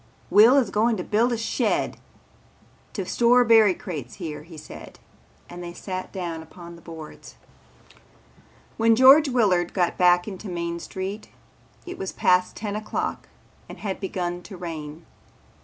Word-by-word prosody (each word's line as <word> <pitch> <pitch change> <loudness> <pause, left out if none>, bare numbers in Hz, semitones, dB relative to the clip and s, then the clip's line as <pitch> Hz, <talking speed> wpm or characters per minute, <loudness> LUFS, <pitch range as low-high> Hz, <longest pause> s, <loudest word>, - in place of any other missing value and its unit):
"Will 225 +7 +7
is 240 -8 +2
going 220 +2 +1
to 180 - -4
build 230 +6 +1
a 235 - 0
shed 225 - -1 1.0
to - - -4
store 245 +1 +4
berry 220 -4 +5
crates 145 -9 -7
here," 155 -6 -7
said 150 - -11
George - - -21 0.5
and 175 0 -9
they 175 0 -7
sat 185 +1 -6
down 170 -4 -5
upon 170 +2 -12
the 170 - -15
boards. 160 -2 -11 1.4
When 225 0 +4
George 270 +5 +7
Willard 195 -9 +1
got 180 -3 0
back 180 0 +4
into 200 0 -7
Main 170 -1 -4
Street 195 +4 -6 0.6
it 360 - -8
was 190 - -4
past 180 0 +2
ten 205 -2 -4
o'clock 215 0 -4 0.4
and - - -9
had 195 -3 -4
begun 180 -2 -3
to 190 +1 -11
rain. 160 -2 -7
185 Hz, 150 wpm, -24 LUFS, 175-220 Hz, 1.4 s, Will